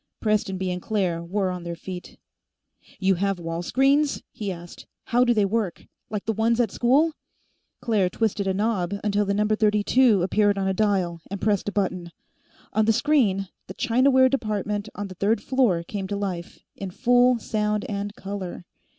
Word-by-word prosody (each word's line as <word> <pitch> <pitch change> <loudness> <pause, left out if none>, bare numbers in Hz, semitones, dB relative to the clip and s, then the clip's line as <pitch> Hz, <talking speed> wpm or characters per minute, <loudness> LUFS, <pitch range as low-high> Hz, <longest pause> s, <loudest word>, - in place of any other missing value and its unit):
Prestonby 190 -4 0
and 180 0 -4
Claire 185 -6 -1
were 190 +2 -1
on 180 -1 -5
their 170 0 -5
feet. 180 +1 -8 0.8
"You 190 0 +2
have 195 -1 +1
wall 165 0 -4
screens?" 275 - +2
he 205 -3 -4
asked. 175 -1 -10 0.2
"How 245 +1 +2
do 245 - +3
they 215 -4 +3
work? 200 -3 -2 0.2
Like 210 -2 -4
the 225 - 0
ones 225 +2 +1
at 230 -5 +2
school?" 280 +9 +3 0.7
Claire 210 -6 +1
twisted 205 -1 -1
a 190 - +1
knob 200 -3 0
until 205 0 +1
the 200 0 0
number 210 +1 +2
32 210 0 +3
appeared 205 +2 +2
on 195 -1 0
a 190 - +1
dial, 185 -5 0
and 200 +1 -5
pressed 205 -1 +1
a - - -6
button. 185 -4 -2 0.6
On 220 - +3
the 225 - +4
screen, 210 -9 +2 0.2
the - - -8
Chinaware 260 +2 +4
Department 210 -5 -2
on 205 -1 -4
the 185 - -9
third 200 +5 +1
floor 240 -10 +1
came 195 +2 -5
to 200 - -3
life 185 -4 -5
in 195 - -6
full 245 +4 +3
sound 210 -1 -1
and 205 0 -4
color. 195 -3 -6
205 Hz, 175 wpm, -24 LUFS, 190-225 Hz, 0.8 s, the